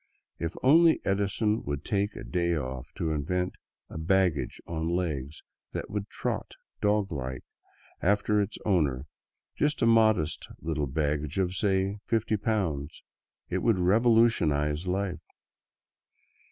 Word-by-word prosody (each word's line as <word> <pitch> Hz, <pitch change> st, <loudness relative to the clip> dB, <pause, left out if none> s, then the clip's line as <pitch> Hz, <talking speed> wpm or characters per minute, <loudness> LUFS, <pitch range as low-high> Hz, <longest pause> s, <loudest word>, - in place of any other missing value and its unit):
If 85 Hz, 0 st, -3 dB
only 160 Hz, +5 st, +6 dB
Edison 100 Hz, +2 st, +1 dB
would 70 Hz, +1 st, -4 dB
take 100 Hz, 0 st, 0 dB
a -, -, -7 dB
day 85 Hz, -1 st, 0 dB
off 65 Hz, -1 st, -5 dB
to 80 Hz, -4 st, -1 dB
invent 90 Hz, +5 st, -1 dB, 0.3 s
a -, -, -7 dB
baggage 90 Hz, -3 st, +1 dB
on 80 Hz, 0 st, -3 dB
legs 75 Hz, -5 st, -3 dB, 0.3 s
that -, -, -5 dB
would 105 Hz, 0 st, -3 dB
trot, -, -, -3 dB, 0.3 s
dog 105 Hz, -1 st, +2 dB
fashion, 65 Hz, -4 st, -4 dB, 0.6 s
after 105 Hz, +2 st, +2 dB
its 100 Hz, +1 st, -3 dB
owner 75 Hz, -10 st, +1 dB, 0.3 s
— -, -, -62 dB
just 150 Hz, -3 st, +1 dB
a -, -, +5 dB
modest 110 Hz, -9 st, +3 dB
little 80 Hz, -3 st, -2 dB
baggage 75 Hz, +3 st, -1 dB
of, 90 Hz, -2 st, +1 dB
say, 95 Hz, 0 st, +1 dB
fifty 110 Hz, -1 st, +1 dB
pounds 95 Hz, -9 st, -2 dB, 0.2 s
— -, -, -52 dB
it -, -, +1 dB
would 115 Hz, -4 st, +2 dB
revolutionize 90 Hz, -7 st, +3 dB
life. 90 Hz, -2 st, -1 dB
90 Hz, 135 wpm, -28 LUFS, 75-105 Hz, 0.6 s, only